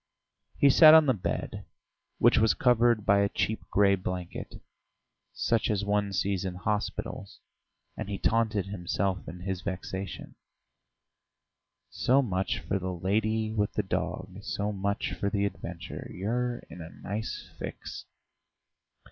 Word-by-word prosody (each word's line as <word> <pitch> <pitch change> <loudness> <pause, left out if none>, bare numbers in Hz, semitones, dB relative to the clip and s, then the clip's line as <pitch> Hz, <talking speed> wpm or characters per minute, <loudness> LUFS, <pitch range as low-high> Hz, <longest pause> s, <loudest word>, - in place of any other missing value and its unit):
He 140 - +6
sat 155 +2 +9
on 160 -1 +7
the 130 - +4
bed, 90 -6 -3 0.5
which - - +5
was 110 0 +4
covered 120 -3 +3
by 100 0 +5
a 100 0 +2
cheap 110 +2 -1
grey 100 0 +4
blanket, 90 -2 -4 0.8
such 115 -2 0
as 100 -2 0
one 100 0 +1
sees 95 -1 0
in 95 -2 -3
hospitals, 100 0 -3 0.6
and - - -5
he 100 - -2
taunted 110 -4 +1
himself 95 0 -1
in 90 +1 -8
his 95 -1 -3
vexation: 95 -1 -5 1.6
"So 135 +3 +3
much 95 -5 -1
for 95 - -2
the 95 0 -3
lady 110 +4 0
with 105 -2 0
the 105 - 0
dog... 95 - -3
so 105 +1 -2
much 100 +1 -2
for 100 - -1
the 100 0 0
adventure.... 85 -4 -6
You're 120 +5 -2
in 90 - -10
a 80 - -8
nice 105 +5 -5
fix...." - - -7
100 Hz, 140 wpm, -29 LUFS, 95-110 Hz, 1.6 s, sat